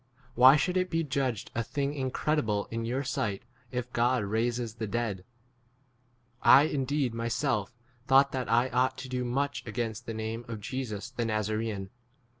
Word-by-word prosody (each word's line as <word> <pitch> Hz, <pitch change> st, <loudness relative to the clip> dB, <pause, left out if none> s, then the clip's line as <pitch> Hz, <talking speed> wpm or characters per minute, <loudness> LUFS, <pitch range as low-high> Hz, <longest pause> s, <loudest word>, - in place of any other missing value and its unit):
Why 130 Hz, +2 st, +8 dB
should 180 Hz, +5 st, +1 dB
it 185 Hz, 0 st, +1 dB
be 165 Hz, -1 st, 0 dB
judged 130 Hz, -6 st, -2 dB
a 115 Hz, -, 0 dB
thing 140 Hz, +3 st, -2 dB
incredible 130 Hz, -5 st, 0 dB
in 115 Hz, 0 st, -2 dB
your 130 Hz, +4 st, -1 dB
sight 105 Hz, -6 st, -2 dB, 0.3 s
if 125 Hz, 0 st, -4 dB
God 120 Hz, 0 st, +2 dB
raises 115 Hz, +2 st, -1 dB
the 110 Hz, -1 st, -4 dB
dead? 105 Hz, -4 st, -2 dB, 1.2 s
9 140 Hz, +2 st, +8 dB
1 -, -, -3 dB
indeed 140 Hz, -2 st, 0 dB
myself 115 Hz, -1 st, -1 dB, 0.3 s
thought 135 Hz, +1 st, +5 dB
that 130 Hz, -3 st, -3 dB
I 120 Hz, +3 st, +3 dB
ought 130 Hz, +1 st, +1 dB
to 130 Hz, -, -7 dB
do 125 Hz, 0 st, -2 dB
much 140 Hz, +4 st, -1 dB
against 115 Hz, -1 st, -3 dB
the 115 Hz, -, -4 dB
name 110 Hz, +1 st, -4 dB
10 115 Hz, -, -5 dB
of -, -, -8 dB
Jesus 115 Hz, -1 st, -5 dB
the 120 Hz, -2 st, -2 dB
Nazaraaan. 110 Hz, -2 st, -2 dB
120 Hz, 170 wpm, -29 LUFS, 110-135 Hz, 1.2 s, Why